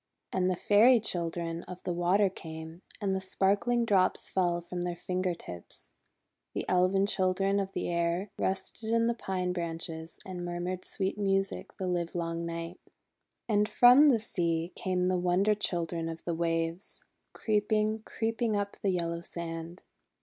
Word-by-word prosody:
And 185 -1 +2
the 185 - +1
Fairy 225 +7 +5
Chil 175 -6 +1
dren 165 0 -4
of 180 0 -9
the 180 - -1
Water 180 +4 +3
came, 160 -2 -8 0.2
and 195 -2 0
the 190 - -1
sparkling 200 +5 +1
drops 190 -4 +2
fell 175 -2 +1
from 175 +1 -6
their 175 0 -2
finger 180 0 -2
tips. 90 - -6 0.6
The - - -2
Elfin 185 +2 +3
Children 195 0 +1
of 195 -1 -3
the - - -2
Air 170 +3 0
rested 190 +4 -2
in 230 0 +3
the 235 - +2
pine 185 -5 -2
branches 165 -1 -4
and 180 -2 -5
mur 175 0 -4
mured 185 +1 -3
sweet 195 +1 -2
music 195 -1 0
the 190 - -3
livelong 170 -1 -2
night. 170 +2 -5 0.7
And 210 -1 +2
from 250 +6 +7
the 260 -6 +5
sea 170 -4 -1
came 180 -1 0
the 185 -1 +1
Wonder 180 +4 +3
Children 170 -5 -2
of 165 0 -7
the 170 - -1
Waves, 165 +1 -2 0.3
creeping, 215 0 +1
creeping 225 0 -1
up 200 0 -2
the 200 - +1
yellow 170 -2 0
sand. 170 0 -6
180 Hz, 160 wpm, -30 LUFS, 170-200 Hz, 0.7 s, from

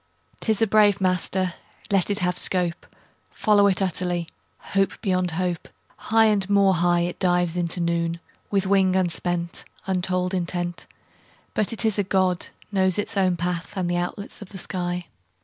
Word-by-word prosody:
'Tis 220 0 +1
a - - +6
brave 205 -2 +4
master; 185 0 0 0.4
Let 195 -1 +2
it 200 - +3
have 180 0 0
scope: 180 -2 +1 0.4
Follow 205 -2 +3
it 195 0 +1
utterly, 175 -2 -2 0.5
Hope 195 0 +1
beyond 185 -4 0
hope: 175 0 -2 0.3
High 225 0 +3
and 205 -3 +2
more 200 -1 +4
high 175 0 +2
It 175 0 -3
dives 175 -2 +2
into 175 0 -1
noon, 170 0 0 0.3
With 195 -2 +1
wing 190 -1 +3
unspent, 175 -1 -1 0.2
Untold 185 0 0
intent; 175 -1 -3 0.7
But 215 - 0
it 230 0 0
is 215 -2 +1
a - - +3
God, 185 -2 +1 0.2
Knows 190 -2 +2
its 205 - -3
own 185 -3 +2
path 175 0 -3
And 180 -2 -1
the 175 - 0
outlets 175 +5 -5
of 200 - -9
the 195 - -9
sky. 180 -1 -3
185 Hz, 165 wpm, -24 LUFS, 175-195 Hz, 0.7 s, a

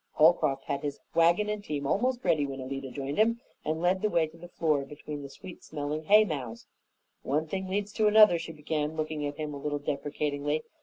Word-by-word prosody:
Holcroft 155 -4 +4
had 140 - -2
his 145 -1 -4
wagon 170 +5 +4
and 210 -1 -3
team 145 -5 -3
almost 245 - 0
ready 150 -2 +3
when 135 -1 -4
Alida 135 +1 -5
joined 140 +4 -4
him, 230 +2 +3 0.2
and 160 +1 -2
led 185 +1 +2
the 215 - +2
way 165 -5 +3
to 155 - -13
the 170 +1 -11
floor 155 -5 0
between 145 +1 -7
the 140 - -8
sweet 180 +5 -11
smelling 150 +1 -4
hay 210 +3 +7
mows. 125 - -5 0.6
"One 150 +4 0
thing 190 +4 -4
leads 205 +2 -2
to 215 - +3
another," 210 -5 +7
she 165 - -6
began, 150 0 -2
looking 155 -1 -2
at 145 - -6
him 150 -1 -4
a - - -5
little 145 0 -1
deprecatingly. 145 +1 -2
155 Hz, 210 wpm, -29 LUFS, 145-180 Hz, 0.6 s, hay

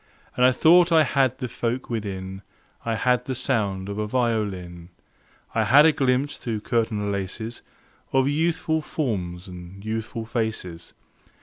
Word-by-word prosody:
And 125 - +2
I 130 - +7
thought 170 +6 +5
I 160 -1 +6
had 130 -2 +1
the 130 - -3
folk 125 +1 -3
within: 95 -4 -4 0.4
I 115 -1 -1
had 125 +2 +1
the 130 - -3
sound 100 -7 -1
of 100 +1 -4
a 105 - -1
violin; 100 -8 -2 0.6
I - - +2
had 145 +4 +7
a 160 - +7
glimpse 135 -1 0
through 110 -3 -4
curtain 110 -3 0
laces 100 +4 -4 0.5
Of 135 0 +3
youthful 160 +1 +1
forms 95 - -3
and 90 +2 -10
youthful 110 +1 -3
faces. 110 -8 -4
115 Hz, 145 wpm, -24 LUFS, 100-130 Hz, 0.6 s, I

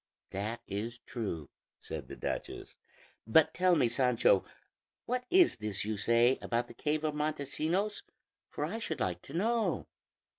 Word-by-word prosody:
"That 110 +4 -3
is 110 +4 -3
true," 90 - -4 0.3
said - - -6
the - - -8
duchess; - - -4 0.5
"but 150 +7 +5
tell 180 0 +4
me, 135 -6 +4
Sancho, 120 -5 +3 0.6
what 250 +1 -1
is 360 -1 +5
this 105 -3 -3
you 110 0 -1
say 115 +4 +3
about 120 0 -1
the - - -11
cave 150 +1 -1
of 155 -1 0
Montesinos, 155 +7 -1 0.5
for 145 - -2
I 210 +9 -4
should 230 - -3
like 90 -2 -1
to 140 - -12
know." 215 - +1
135 Hz, 150 wpm, -32 LUFS, 110-175 Hz, 0.6 s, but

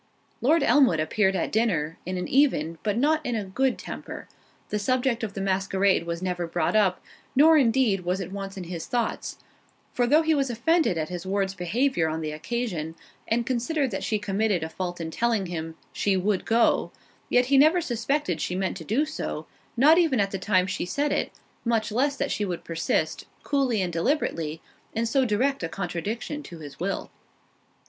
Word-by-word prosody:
Lord 310 +7 +4
Elmwood 265 - +4
appeared 190 +5 +1
at - - -1
dinner, 170 -9 0
in 185 0 -2
an 180 - -3
even, 170 - +2
but 210 0 -1
not 305 +4 +2
in 245 -4 -2
a 215 - -1
good 250 +7 0
temper; - - -8 0.4
the 210 - -1
subject 250 +1 0
of 210 -3 -4
the 195 - -3
masquerade 190 -2 +1
was 170 +1 -3
never 180 -2 -2
brought 165 +3 0
up, 195 -4 +2 0.3
nor 315 +4 +7
indeed 245 -6 +3
was 180 +1 -1
it 185 -1 -5
once 195 0 -6
in 185 - -5
his 170 -2 -6
thoughts; 240 -2 -2 0.6
for 245 -1 +1
though 305 +5 +5
he 320 0 +3
was 275 -3 +1
offended 250 - +2
at 155 -1 -2
his 175 -1 -5
ward's 195 0 -1
behaviour 190 - 0
on 160 +1 -3
the 155 -1 -3
occasion, 165 -1 -3 0.3
and 235 +1 +1
considered 260 +3 0
that 195 - -3
she 215 - 0
committed 205 -2 0
a 160 - -4
fault 175 +1 -4
in 165 -1 -4
telling 230 0 +1
him, 165 -2 -5 0.2
"She 195 -2 +1
would 190 +1 0
go," 230 +1 +2 0.4
yet 245 0 +4
he - - +7
never 315 +5 +6
suspected 240 - -1
she 180 - -2
meant 190 0 -1
to 165 - -8
do 240 - +1
so, 315 - -5 0.3
not 305 +7 +6
even 310 -9 +2
at 195 -1 +1
the 195 - -3
time 185 -1 +2
she 185 - -3
said 290 +10 0
it, - - 0 0.3
much 230 -2 0
less 275 +6 +1
that - - -2
she 210 - -1
would 180 -4 -3
persist, 165 -1 -1 0.2
coolly 260 -8 +1
and 175 -2 -3
deliberately, 165 - -1 0.3
in 225 +1 +1
so 260 +3 +2
direct 255 +5 +1
a 165 - -2
contradiction 195 - -4
to 175 - -10
his 145 -3 -10
will. 195 +3 -3
205 Hz, 195 wpm, -26 LUFS, 180-255 Hz, 0.6 s, nor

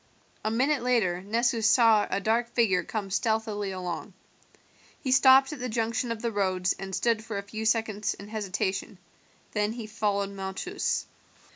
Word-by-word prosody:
A 215 - 0
minute 265 +5 +1
later 220 -8 +1
Nessus 230 +2 +1
saw 220 -2 +5
a 195 - 0
dark 230 +3 +1
figure 195 -7 +3
come 205 -3 -4
stealthily 215 0 0
along. 185 +1 -5 0.9
He 260 - -3
stopped 270 +2 +6
at 295 - -8
the 250 0 -3
junction 230 +1 -1
of 230 0 -5
the 235 - 0
roads 185 -3 +1
and 190 -1 -4
stood 230 -2 +1
for 220 -2 -5
a 200 - -3
few 215 +2 -6
seconds 220 -2 0
in 200 - -11
hesitation, 195 -1 -3 0.6
then 210 0 0
he 235 -2 -6
followed 205 -2 -1
Malchus. 195 - -3
220 Hz, 160 wpm, -27 LUFS, 200-235 Hz, 0.9 s, stopped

